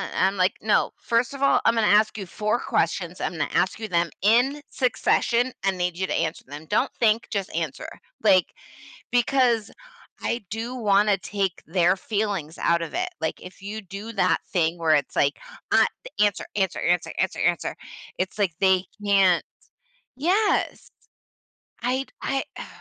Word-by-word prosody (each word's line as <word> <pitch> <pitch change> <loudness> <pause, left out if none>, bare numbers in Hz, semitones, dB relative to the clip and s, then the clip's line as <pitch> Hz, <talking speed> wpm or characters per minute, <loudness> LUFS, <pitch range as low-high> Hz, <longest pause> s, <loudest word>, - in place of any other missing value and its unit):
I'm 195 +1 +2
like, 185 +1 +3
'No, 215 - +2
first 235 +3 0
of 275 - -8
all, 275 - +5
I'm - - +4
gonna 225 -2 +2
ask 215 +1 +4
you 200 - -5
4 210 +5 -1
questions, 175 -1 -1
I'm - - -2
gonna 155 -3 -2
ask 185 +4 +1
you 220 - -4
them 170 -1 +1
in 245 +8 +3
succession 245 -1 +1
and 195 -1 +1
need 180 -1 -1
you 190 0 -1
to - - -2
answer 165 -1 -1
them, 145 +3 -9
don't 205 - +1
think, 225 0 +2
just 200 -2 -3
answer," - - -3 0.4
like, 190 -4 +4 0.6
because, 245 -3 +2 0.5
I 235 - -2
do 230 +4 -4
wanna 205 -3 +3
take 195 -2 -3
their 175 +2 +3
feelings 200 -6 -3
out 170 0 +2
of 165 - -5
it, 360 +2 -1
like, - - -2
if 180 +1 -12
you 210 +2 -6
do 200 +3 -8
that 185 -5 +2
thing 170 -2 +1
where 165 -2 +2
it's 145 - -1
like, 140 0 +2 0.3
at - - +5 0.3
"Answer, 205 -1 +2
answer, 190 -3 0
answer, 175 0 +1
answer, 190 - -1
answer." 175 -1 0 0.4
It's, 185 +3 -3
like, 200 -5 +1
they 190 -1 +3 0.2
can't 195 -4 +4 0.7
Yes! 380 +9 +1 0.9
I 255 +3 0 0.2
I 270 -1 -1
Ugh. - - -6
200 Hz, 165 wpm, -24 LUFS, 180-230 Hz, 0.9 s, all